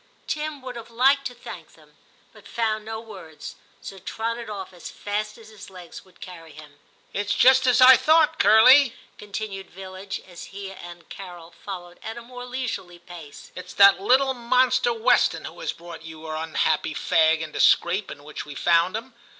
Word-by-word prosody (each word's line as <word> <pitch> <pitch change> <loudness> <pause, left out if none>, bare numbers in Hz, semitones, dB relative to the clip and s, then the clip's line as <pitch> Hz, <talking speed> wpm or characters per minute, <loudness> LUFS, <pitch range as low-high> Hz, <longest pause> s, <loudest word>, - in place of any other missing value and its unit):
Tim 300 -3 -4
would 255 -1 -7
have 230 0 -10
liked 270 +4 +2
to 245 - -12
thank 240 - -11
them, - - -22 0.4
but - - -16
found 220 -2 -2
no 220 0 -5
words, 165 -9 -11 0.3
so 195 - -9
trotted 230 +4 -5
off 195 -3 -7
as 175 - -10
fast 210 +1 -4
as 225 -1 -15
his 210 -2 -13
legs 180 -3 -12
would 185 -1 -24
carry 165 -4 -11
him. 145 -1 -15 0.2
* - - -36
It's 205 0 -1
just 260 0 +5
as 250 0 +4
I 255 0 +9
thought. 315 +3 +3
Curly,' 250 +5 +6 0.2
continued 200 -2 -6
Villidge, 190 +1 -8
as 175 -2 -10
he 195 -1 -9
and 175 -2 -12
Carol 175 -3 -10
followed 175 -1 -10
at 225 +1 -7
a 235 - -9
more 245 +1 -10
leisurely 245 -8 -5
pace; 170 -4 -13
* - - -33
it's 180 0 -10
that 200 -2 +6
little 265 +5 +3
monster 250 0 +2
Weston 230 0 +2
who - - -10
has - - -3
brought 170 -1 -11
your 160 -1 -9
unhappy 160 0 -1
fag 160 0 +2
into 155 -1 -7
the - - -5
scrape 185 +4 +3
in 145 - -10
which 150 +1 -7
we 145 - -10
found 170 +4 +2
him. 240 +3 -10
200 Hz, 190 wpm, -24 LUFS, 175-240 Hz, 0.4 s, I